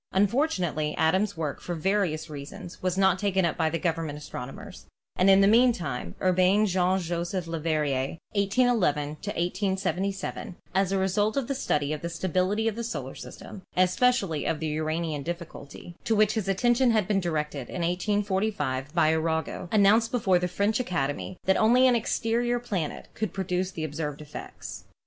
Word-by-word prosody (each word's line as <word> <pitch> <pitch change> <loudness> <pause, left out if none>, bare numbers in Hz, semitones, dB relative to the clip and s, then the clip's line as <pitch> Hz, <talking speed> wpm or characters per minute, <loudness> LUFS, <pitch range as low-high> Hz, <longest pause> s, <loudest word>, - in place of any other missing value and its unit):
Unfortunately, 190 - +1
Adams' 185 +5 +2
work, 150 -4 -3
for 175 - -4
various 170 -2 0
reasons, 170 +5 -9
was 185 0 -1
not 190 -1 +3
taken 190 -3 +1
up 170 - 0
by 160 -2 +1
the 165 - -1
government 165 -4 -2
astronomers, 135 -3 -8 0.3
and 185 +2 +4
in 195 0 +7
the 195 - +6
meantime 185 - +2
Urbain 185 +3 +3
Jean 185 -1 +2
Joseph 175 +1 -3
Leverrier 155 -4 -1
(1811 200 - +2
1877), 190 +4 -2 0.2
as 190 0 +2
a 195 - +1
result 205 +5 +1
of 270 -4 0
the 275 - -1
study 150 - 0
of 150 - -5
the 170 - -3
stability 185 +5 0
of 220 - 0
the 235 - -4
solar 145 - -4
system, 200 - -10
and 185 0 +5
especially 195 - +1
of 155 - -1
the 160 - -2
Uranian 155 0 -2
difficulty, 170 0 -7
to 225 - +1
which 215 0 +4
his 215 -4 -2
attention 240 +6 +3
had 215 -5 +2
been 205 -2 +2
directed 150 -6 -2
in 180 - -3
1845 185 -6 -1
by 160 -2 +4
Arago, 160 +2 -2
announced 215 +2 +5
before 195 -7 +2
the 180 - 0
French 200 +5 0
Academy 175 - -2
that 190 - +3
only 245 +4 +5
an 250 -2 +5
exterior 235 +1 0
planet 195 -10 -4
could 215 -3 -3
produce 185 -1 -1
the 165 -4 -6
observed 150 -1 -4
effects. 150 -1 -9
185 Hz, 165 wpm, -27 LUFS, 160-205 Hz, 0.3 s, in